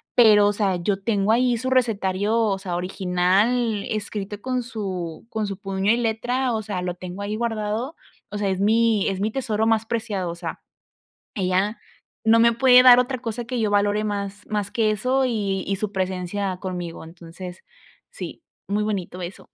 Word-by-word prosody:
pero, 210 -4 +7
o 205 - +2
sea, 200 -3 0
yo 195 +2 -1
tengo 205 -1 +1
ahí 245 +1 +3
su 260 - -2
recetario, 210 -5 +1
o 210 -4 +1
sea, 185 -2 -4
original, 195 +5 +1
escrito 205 -1 -4
con 255 0 -1
su 190 -6 -5
con 220 -2 -2
su 200 -1 -4
puño 195 0 0
y 230 - +3
letra, 245 +2 0
o 220 - -2
sea, 200 -4 -3
lo 180 -1 -3
tengo 180 +2 -7
ahí 205 +1 -3
guardado. 225 +4 -2 0.4
O 205 - -4
sea, 200 -1 0
es 190 0 -1
mi 220 0 +3
es 195 -1 -1
mi 210 +2 0
tesoro 220 -3 -1
más 225 -1 +2
preciado, 215 -6 -2
o - - -7
sea, 170 -2 -6 0.7
ella 190 +2 0 0.5
no 230 +1 +6
me 235 0 +5
puede 250 +1 +7
dar 250 -1 +9
otra 250 +1 0
cosa 235 0 -4
que 240 +1 -3
yo 215 -2 +1
valore 205 +1 +2
más 200 -1 -4
más 210 -2 -2
que 220 -2 +2
eso 255 +6 +1
y 200 -6 -1
y 195 - 0
su 205 +1 -3
presencia 185 0 -2
conmigo, 180 -4 -5
entonces 175 +2 -10 0.5
sí, - - -8 0.3
muy 205 +1 0
bonito 190 -4 -3
eso. 175 +3 -8
205 Hz, 185 wpm, -23 LUFS, 190-230 Hz, 0.7 s, dar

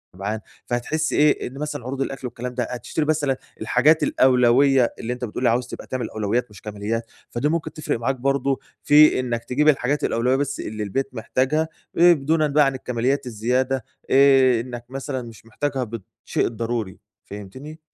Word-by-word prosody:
شبعان، 100 +3 -3 0.3
فهتحس 155 +6 -1
إيه، 150 0 +3
إن 130 +2 -10
مثلًا 150 -4 -4
عروض 135 +1 -4
الأكل 135 -1 -3
والكلام 125 +1 -6
ده، 125 0 -1
هتشتري 125 +5 -3
مثلًا 145 -4 +1 0.2
الحاجات 155 +2 +3
الأولوية، 130 0 +4
اللي 120 +2 -3
أنت 125 0 -4
بتقول 120 +2 -5
لي 120 - +5
عاوز 120 +2 0
تبقى - - -9
تعمل 130 -2 -3
الأولويات 110 +4 -1
مش 100 -3 -14
كماليات، 110 +2 -4 0.2
فدي 130 +5 -1
ممكن 165 0 -2
تفرِق 150 -6 -3
معاك 135 +3 0
برضو، 135 +1 0 0.2
في 150 -2 +6
إنك 120 -2 -2
تجيب 135 +6 0
الحاجات 140 +1 +1
الأولوية 125 +3 +1
بس 140 0 -2
اللي 105 0 -4
البيت 135 +7 -2
محتاجها، 135 +7 0 0.3
آآ، 175 +1 +7
دونًا 155 +1 +1
بقى 150 +1 +4
عن 135 -1 0
الكماليات 125 +2 -1
الزيادة، 125 +2 -1 0.2
آآ، 135 -3 +5
إنك 120 -1 -8
مثلًا 135 0 -4
مش 115 -1 -12
محتاجها 135 +2 -2
ب 115 -1 -6 0.2
بالشيء - - 0
الضروري. 115 -4 -3 0.3
فهمتني؟ 130 +11 -9
130 Hz, 175 wpm, -23 LUFS, 115-140 Hz, 0.3 s, آآ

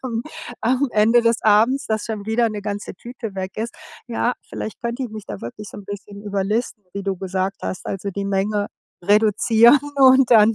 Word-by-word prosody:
am 235 -3 -2 0.4
am 260 +4 +1
Ende 220 +3 +5
des 230 0 +3
Abends, 225 +6 +4
dass 220 -1 -1
schon 215 -3 -5
wieder 225 +1 +2
'ne 210 -1 -5
ganze 205 -1 -4
Tüte 230 0 -8
weg 190 0 -4
ist. 230 +2 -4 0.3
Ja, 240 +1 0
vielleicht 215 - -6
könnte 235 +2 -2
ich - - -5
mich 215 -2 -8
da 100 - -7
wirklich 200 - -8
so - - -9
'n 205 - -11
bisschen 205 0 -8
überlisten, 205 +2 -2
wie 200 - -4
du 195 -1 -2
gesagt 190 +1 -2
hast. 185 - -5
Also 195 +1 -3
die 200 +1 -4
Menge 205 +1 0 0.4
reduzieren 220 +5 +5 0.2
und 265 -2 +6
dann 225 -1 +6
215 Hz, 195 wpm, -21 LUFS, 200-235 Hz, 0.4 s, und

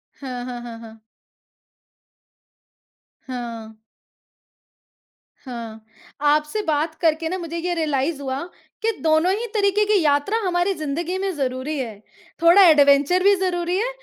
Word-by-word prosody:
हाँ, 250 -3 -6
हाँ, 245 -1 -6
हाँ, 235 -1 -8
हाँ। 225 -1 -13 2.3
हाँ। 235 -3 -6 1.7
हाँ, 230 -3 -7 0.4
आपसे 300 +7 +1
बात 310 +1 0
करके 320 -1 +1
ना 370 - -2
मुझे 335 -1 -6
ये 350 +1 -2
रियलाइज़ 300 -2 -1
हुआ 265 0 -3 0.4
कि 455 - +1
दोनों 315 +3 +3
ही 455 +3 -3
तरीके 415 0 +2
की 415 -2 +3
यात्रा 290 +9 +2
हमारी 355 +2 +1
जिंदगी 325 +3 -3
में 390 0 -1
ज़रूरी 270 +2 -3
है। 235 -5 -4 0.5
थोड़ा 345 +4 +7
एडवेंचर 290 +3 +5
भी 400 +1 +6
ज़रूरी 360 -1 -1
है 475 +4 0
310 Hz, 130 wpm, -22 LUFS, 265-360 Hz, 2.3 s, थोड़ा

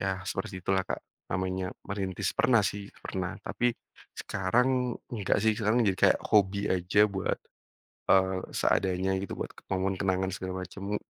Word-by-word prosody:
Ya 95 -1 -1
seperti 95 -1 -3
itulah, 95 0 +1
Kak, - - -3 0.3
namanya 95 +1 -1 0.2
merintis. 95 -2 -2
Pernah 120 -3 +5
sih, 100 0 -3 0.2
pernah 95 -2 -3
tapi 120 0 0 0.4
sekarang, 125 +6 +1
nggak 105 -5 +1
sih, 110 0 +4
sekarang 110 +3 +2
jadi 95 -1 +2
kayak - - +5
hobi 100 0 +3
aja 95 +3 +4
buat, 95 -1 -1 0.7
eee, 95 0 +4 0.2
seadanya 95 0 +1
gitu, 100 - -5
buat - - -3
ke - - -16
momen 95 +1 +1
kenangan 95 -1 +1
segala 95 -1 -4
macam. 100 +3 -4
95 Hz, 150 wpm, -29 LUFS, 95-105 Hz, 0.7 s, Pernah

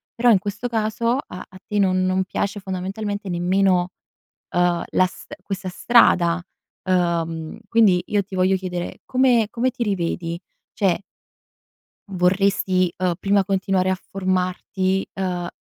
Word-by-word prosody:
Però 240 +1 +3
in 205 - +6
questo, 205 +4 -4
caso 230 +2 0
a 180 - -8
a 185 - -14
te 210 -1 -1
non 185 -1 +2
non 185 0 +1
piace 200 +2 -2
fondamentalmente 195 +2 -4
nemmeno, 180 +1 +2 0.6
uhm, 175 -1 +2
la 185 - +3
st - - -12
questa 190 -2 -4
strada, 180 -5 +4 0.5
uhm. 165 -2 0
Quindi, 205 -6 +4
io 205 -1 +1
ti 195 - -17
voglio 185 +1 +3
chiedere: 180 -2 -5
come 250 -4 +3
come 250 +2 +1
ti 245 -1 -3
rivedi? 170 -4 -2 0.3
Cioè 190 -3 +1 1.1
vorresti, 185 -1 +2
uhm, 185 -1 0
prima 200 0 +2
continuare 190 -1 +1
a - - +2
formarti, 185 0 -1
uhm, 180 -2 -3
190 Hz, 135 wpm, -22 LUFS, 180-205 Hz, 1.1 s, in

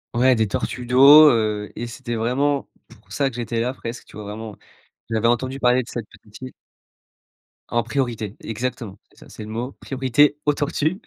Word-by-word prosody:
Ouais 130 +1 +4
des 110 -1 +1
tortues 125 +5 -4
d'eau, 140 +5 +8
heu, 105 -2 -1
et 120 - -5
c'était 120 0 -6
vraiment 135 +5 0 0.3
pour - - -27
ça 135 -2 0
que - - -13
j'étais 115 -1 -3
là 125 +3 -1
presque, 115 -2 -8
tu - - -17
vois 105 -1 -8
vraiment, 105 0 -7 0.6
j'avais 115 +1 +1
entendu 130 +3 -1
parler 125 +1 +3
de - - -13
cette 115 -3 -6
petite 105 +3 -17
île. 130 0 -8 1.2
En 120 -1 0
priorité 115 -4 -3
exactement. 115 -3 -5
C'est - - -23
ça, - - -15
c'est 110 - -9
le 105 - -9
mot, 120 +4 -4
priorité 135 +2 +2
aux 150 - +3
tortues 155 +6 -1
120 Hz, 190 wpm, -22 LUFS, 110-130 Hz, 1.2 s, d'eau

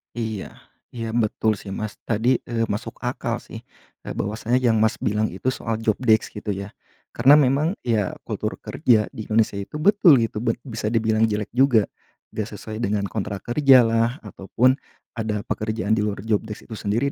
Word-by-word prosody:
Iya 110 -4 -4 0.4
iya 115 -1 -4
betul 110 -2 0
sih 95 -1 -7
Mas. 105 -1 -5
Tadi, 120 +3 +2
eee, 115 -1 -1
masuk 110 +2 -4
akal 125 +1 -2
sih - - -9 0.5
e - - -12
bahwasanya 115 +5 -1
yang 115 -3 +3
Mas 110 0 +2
bilang 105 +1 0
itu 105 +8 -2
soal 115 -3 -3
job 110 -1 +1
desk 110 -4 +2
gitu 105 -1 -4
ya? 100 +1 -6 0.4
Karena 135 +5 +6
memang 150 +5 +3
ya 110 -6 0
kultur - - -3
kerja 110 -4 +1
di 110 - -8
Indonesia 110 -2 +1
itu 100 - -8
betul 175 0 +5
gitu, 110 -1 -3
bet 115 0 0
bisa 110 -5 -4
dibilang 110 0 +2
jelek 105 -1 -3
juga. 125 -3 +4 0.5
Nggak 105 -1 -3
sesuai 110 +2 -7
dengan 105 -3 0
kontrak 100 -2 -4
kerjalah 120 -2 +4
ataupun 115 +6 +1 0.4
ada 105 -2 -2
pekerjaan 110 -1 -2
di 110 - +3
luar 105 -1 -2
job 110 -2 +1
desk 105 - -8
itu 115 - -9
sendiri 115 +8 0
110 Hz, 175 wpm, -23 LUFS, 105-120 Hz, 0.5 s, Karena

